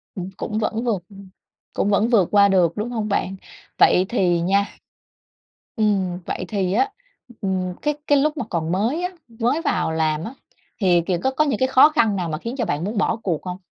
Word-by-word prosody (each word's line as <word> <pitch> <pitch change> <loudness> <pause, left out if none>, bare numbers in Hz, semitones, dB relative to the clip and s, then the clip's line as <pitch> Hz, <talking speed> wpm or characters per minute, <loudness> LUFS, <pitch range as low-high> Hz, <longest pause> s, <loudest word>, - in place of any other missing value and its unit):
Ừm, 185 0 -5
cũng 215 +1 -3
vẫn 220 +2 -1
vượt 210 -8 -1
ừm, 195 -1 -13 0.4
cũng 205 - 0
vẫn 205 +3 +3
vượt 205 -8 +4
qua 200 -1 +6
được, 180 -4 +3
đúng 220 +3 -2
hông 220 -3 -2
bạn? 195 -1 -1 0.4
Vậy 185 - +5
thì 175 -7 +1
nha 200 +3 +2 1.1
ừm, 195 -5 0
vậy 185 - -4
thì 190 -2 -1
á, 400 - +2 0.5
ừm, 185 -2 -1
cái 295 0 +1
cái 290 - +5
lúc 300 +2 +1
mà 245 - -2
còn 165 -2 -2
mới 230 - 0
á, 360 - 0 0.2
mới 240 +7 -1
vào 160 - 0
làm 160 0 0
á, 230 - -6 0.5
thì, 180 -4 +3
kiểu, 175 -2 0
có 265 - +2
có 305 +4 +2
những 285 -3 -1
cái 260 - +3
khó 265 +3 +6
khăn 225 -10 +2
nào 175 -3 -2
mà 155 - -2
khiến 230 +8 -6
cho 235 - 0
bạn 155 -2 -2
muốn 210 +3 -3
bỏ 205 - +1
cuộc 170 -6 -1
hông? 180 0 -4
200 Hz, 215 wpm, -22 LUFS, 180-235 Hz, 1.1 s, qua